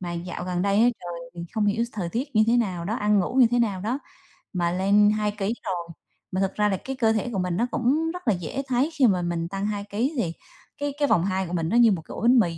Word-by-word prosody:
mà 175 -2 -4
dạo 175 +1 -5
gần 180 0 -1
đây 200 0 +1
á 240 - +6
trời 170 -1 -7
thì 170 - -7
không 215 -1 +1
hiểu 220 +3 +1
s 235 - -8
thời 185 -5 -3
tiết 235 - -3
như 215 - +6
thế 235 +1 +4
nào 185 -7 -1
đó, 210 +5 -2
ăn 210 -3 +2
ngủ 185 +5 -1
như 260 -2 +7
thế 245 - +2
nào 205 -6 0
đó 235 +7 -1 0.6
mà 175 -1 0
lên 200 +3 +4
2 210 -1 0
ký 205 +3 -1
rồi, 175 -2 -3 0.4
mà 185 - -1
thực 195 0 -1
ra 210 0 +2
là 190 - 0
cái 270 0 -3
cơ 225 -3 +2
thể 220 +2 -1
của 195 - -1
mình 180 -1 -1
nó 240 +4 +1
cũng 305 +7 +1
rất 360 -6 -9
là 220 - +5
dễ 180 - -4
thấy 260 +4 +1
khi 280 -5 +4
mà 185 -4 +2
mình 170 -1 -2
tăng 195 +2 -3
2 205 -1 -2
ký 240 +10 -1
thì 170 -8 -1 0.4
cái 285 -1 -2
cái 290 - +3
vòng 185 -8 +3
2 190 -1 -1
của 175 - -6
mình 165 -1 -1
nó 235 - +2
như 235 -2 +6
một 180 -5 -1
cái - - -11
ổ - - -6
bánh 245 +2 +5
mì 170 -6 +1
205 Hz, 295 wpm, -25 LUFS, 180-235 Hz, 0.6 s, như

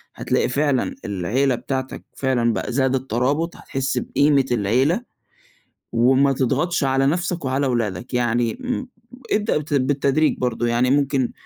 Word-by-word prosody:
هتلاقي - - 0
فعلًا 140 0 0
العيلة 110 +8 0
بتاعتك 130 +2 -4
فعلًا 120 -4 +1
بقى 125 - -3
زادت 130 0 0
ترابط، 140 +9 0
هتحس 135 -1 -3
بقيمة 140 -2 +2
العيلة، 125 - +2 0.9
وما 130 +4 +3
تضغطش 140 +6 0
على 135 0 +2
نفْسك 170 0 -1
وعلى 135 +2 0
ولادك، 120 -3 -2
يعني 120 -1 +1
م 255 0 -3 0.4
ابدأ 210 -4 +1
بت 150 0 -4
بالتدريج 140 +2 +2
برضو، 120 -2 -1
يعني 120 +2 +2
ممكن 140 -2 +1
130 Hz, 130 wpm, -21 LUFS, 120-145 Hz, 0.9 s, وما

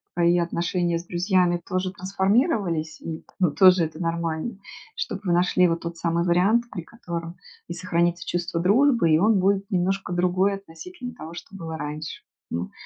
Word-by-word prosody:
твои 175 0 +3
отношения 170 0 0
с 175 - -11
друзьями 175 -1 +1
тоже 185 0 -2
трансформировались. 190 - 0
И 160 -1 -6
т - - -25
ну, 180 -5 +3
тоже 185 0 +6
это 160 +1 -8
нормально. 165 +4 -2 0.4
Чтоб 195 - -4
вы 180 - 0
нашли 180 +1 +4
вот 165 0 -1
тот 170 0 -6
самый 170 +1 0
вариант, 195 +7 +3
при 175 - -5
котором 170 -4 -7 0.3
и 170 - -5
сохранится 170 0 0
чувство 175 -1 -2
дружбы, 230 - +4
и 155 - +6
он 210 +1 +4
будет 195 +1 +1
немножко 190 +1 0
другой 180 +3 +2
относительно 245 - -9
того, 165 -8 -9
что 195 +3 -10
было 160 -3 -6
раньше. 150 +1 -6 0.3
М. 85 +2 -3
175 Hz, 170 wpm, -24 LUFS, 170-195 Hz, 0.4 s, тоже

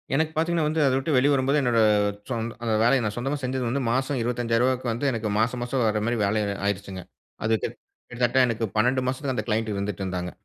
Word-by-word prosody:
எனக்கு 160 +2 +1
பாத்தீங்கன்னா 165 0 +1
வந்து 155 0 0
அத 130 - +3
விட்டு 140 +4 -2
வெளிய 140 +3 +4
வரும்போது 135 +2 +2
என்னோட 120 -3 +2 0.5
சொந் 115 -2 -2 0.2
அந்த 115 -2 0
வேலைய 130 +2 +4
நான் 105 - -2
சொந்தமா 135 +4 -1
செஞ்சது 130 0 -1
வந்து 135 +3 -1
மாசம் 130 +1 0
ரூ.25,000க்கு 120 +1 0
வந்து 130 +5 0
எனக்கு 110 -2 -2
மாசம் 120 +2 0
மாசம் 125 +1 -1
வர்ற 105 0 0
மாரி 120 0 0
வேலை 105 +2 +1 0.2
ஆயிருச்சுங்க. 100 -2 -3 0.4
அது 110 - +2
கிட்டத்தட்ட 120 +2 -2
எனக்கு 115 -1 -1
12 125 +4 +2
மாசத்துக்கு 130 0 -2
அந்த - - -1
க்ளையன்ட் 110 -1 0
இருந்துட்டு 100 -1 -3
இருந்தாங்க. 90 -1 -3
120 Hz, 195 wpm, -25 LUFS, 110-130 Hz, 0.5 s, வெளிய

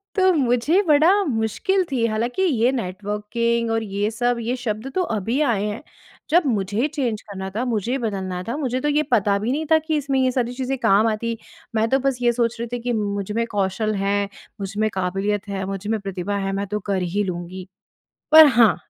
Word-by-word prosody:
तो 375 -1 +4
मुझे 275 - +2
बड़ा 325 +7 +5
मुश्किल 295 - 0
थी 240 -4 +1
हालाँकि 230 +8 -1
ये 250 -7 +2
नेटवर्किंग 225 +2 -2
और 225 0 0
ये 205 +1 -1
सब, 245 +1 0
ये 240 +3 -1
शब्द 240 +1 -4
तो 370 - +2
अभी 225 - -1
आए 230 -9 +1
हैं। 210 +7 -4 0.5
जब 345 +3 +4
मुझे 210 +1 0
चेंज 240 -8 -1
करना 190 -2 -7
था, 220 +5 -2
मुझे 235 +2 -1
बदलना 190 -6 -3
था 235 - -2
मुझे 255 -4 -1
तो 295 - -1
ये 300 +1 +2
पता 200 -3 +3
भी 225 +4 -1
नहीं 310 +4 -1
था 320 - +7
कि 315 -1 0
इसमें 275 -2 0
ये 255 -1 +2
सारी 245 -1 -1
चीज़ें 265 +1 -2
काम 205 +1 +4
आती। 225 +1 -2 0.4
मैं 220 +1 +2
तो 270 - +3
बस 270 -1 0
ये 240 0 +4
सोच 235 0 0
रही 235 - -3
थी 245 - -1
कि 245 -1 -1
मुझ 205 -2 -2
में 230 +2 0
कौशल 205 +1 0
है, 200 0 0 0.3
मुझ 195 0 -4
में 215 0 +2
काबिलियत 195 +2 -1
है, 195 -1 -3
मुझ 195 +1 -5
में 220 -1 0
प्रतिभा 195 0 -4
है 195 -1 -2
मैं 200 0 -2
तो 210 +2 -2
कर 190 -2 +1
ही 205 +1 +1
लूँगी। 180 0 -5 0.7
पर 315 -1 +11
हाँ, 220 -6 +7
225 Hz, 210 wpm, -22 LUFS, 200-255 Hz, 0.7 s, पर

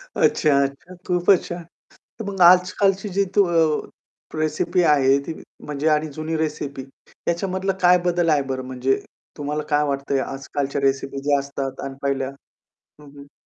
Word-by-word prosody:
अच्छा-अच्छा. 140 +4 +1
खूपच 180 +1 +3
छान. 175 0 -6 0.6
तर 225 - -5
मग 195 -2 -7
आजकालची 190 +2 +3
जी 200 - +4
त - - +2 1.0
रेसिपी 155 +3 0
आहे, 140 -3 +4
ती 160 - -4 0.3
म्हणजे 150 +1 -1
आणि 155 0 +2
जुनी 155 +2 -3
रेसिपी 145 -3 -3 0.3
ह्याच्यामधला 190 +2 -2
काय 180 0 +6
बदल 175 -1 +1
आहे 145 -2 +3
बरं 130 0 -3
म्हणजे 130 +1 0 0.4
तुम्हाला 150 +1 -2
काय 150 0 +3
वाटतंय 140 -1 -1
आजकालच्या 135 +1 -3
रेसिपी 135 0 0
ज्या 145 -1 +4
असतात 135 -1 -5
अन 135 - -5
पहिल्या? 135 -1 -1 0.7
हं, 150 - -14
हं. 140 0 -17
150 Hz, 145 wpm, -22 LUFS, 140-175 Hz, 1.0 s, काय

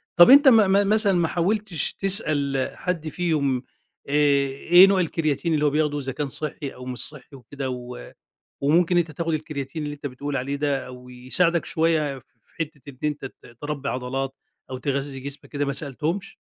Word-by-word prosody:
طَب 175 - +8
أنتَ 280 +2 +8
م 255 - +8 0.2
م 200 +1 +3
مثلًا 215 -2 +3
ما 170 -2 +2
حاوَلتِش 185 -1 -1
تسأَل 145 -9 +1
حد 170 -3 -3
فيهُم، 150 -6 -1 0.5
آآ، - - -3
إيه 145 +5 +5
نوع 195 -1 +2
الكرياتين 165 -1 -1
اللي 150 -1 +1
هو - - +4
بياخُدوه، 150 0 0
إذا 135 0 -4
كان 145 +2 -3
صحِّي 145 0 -4
أو 125 - -10
مش 125 -1 -5
صحِّي 145 -1 -3
وكده، 135 +1 -6
و 125 - -7 0.5
وممكن 165 +5 +3
أنتَ 165 -2 0
تاخُد 165 +2 -2
الكرياتين، 150 -1 -5
اللي 145 0 -4
أنتَ 145 0 -8
بتقول 140 +2 -4
عليه 140 +2 -2
ده، 140 -2 -1
أو 125 0 -11
يساعدك 145 +8 +1
شوية 155 -4 0
في - - -27
حتّة 150 -3 -4
إن 130 -2 -11
أنتَ 150 -2 -2
ت 120 -3 -12
تربِّي 145 -1 -4
عضلات 130 +1 -3 0.4
أو 130 - -5
تغذِّي 135 0 -3
جسمك 140 +1 -8
كده، 145 -1 -2
ما 140 - -2
سألتهمش؟ 160 +7 -3
145 Hz, 180 wpm, -24 LUFS, 135-165 Hz, 0.5 s, طَب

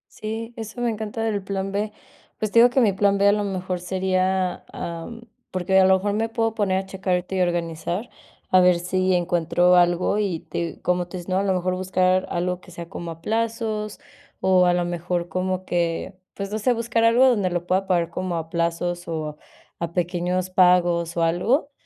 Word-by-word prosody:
Sí, 225 +2 -5
eso 220 +1 -7
me 240 -1 +1
encanta 220 +1 -4
del 210 -3 -1
plan 195 0 -3
B, 205 +1 -2 0.5
pues, 215 -1 -2
te 230 - +5
digo 245 - +8
que 260 +2 +2
mi 210 -5 +3
plan 200 +1 +2
B, 200 0 +4
a - - +7
lo 210 0 0
mejor, 185 -2 -3
sería, 185 0 0
am, 170 +8 -6 0.3
porque, 185 +1 +2
a 190 - +6
lo 190 - +6
mejor, 200 +2 -1
me 225 +2 0
puedo 225 -1 0
poner 200 -4 +1
a 190 - -2
checar 190 -1 -2
ahorita 180 +1 -4
y 190 - +1
organizar, 175 +4 -2 0.4
a 185 - +7
ver 180 -1 +5
si 185 +1 0
encuentro 175 0 +2
algo 175 +3 +3
y 190 -6 -1
te 170 0 -5
cómo 180 0 0
tú 185 - -7
dices, 175 +1 -8
¿no?, 185 +1 +2
a - - 0
lo 195 -2 +1
mejor, 180 0 0
buscar 185 0 +1
algo 180 +1 -2
que - - -16
sea 170 -1 -8
como 170 -3 -6
a 165 0 -9
plazos, 220 0 -2 0.4
o 185 -1 +4
a 175 - +4
lo 175 0 0
mejor, 175 0 -2
como 185 0 -2
que, 170 +1 -1 0.2
pues, 200 0 -5
no 215 - -2
sé, 250 +3 +2
buscar 230 0 0
algo 240 +3 +6
donde 205 -7 +2
lo 175 0 -2
pueda 190 +2 0
pagar 170 -2 +1
como 185 0 -3
a 160 0 -5
plazos 170 +1 -1
o 155 -2 -4 0.4
a 170 0 -4
pequeños 180 +1 -1
pagos 175 -2 +3
o 170 - +2
algo. 230 - +1
185 Hz, 210 wpm, -23 LUFS, 175-205 Hz, 0.5 s, digo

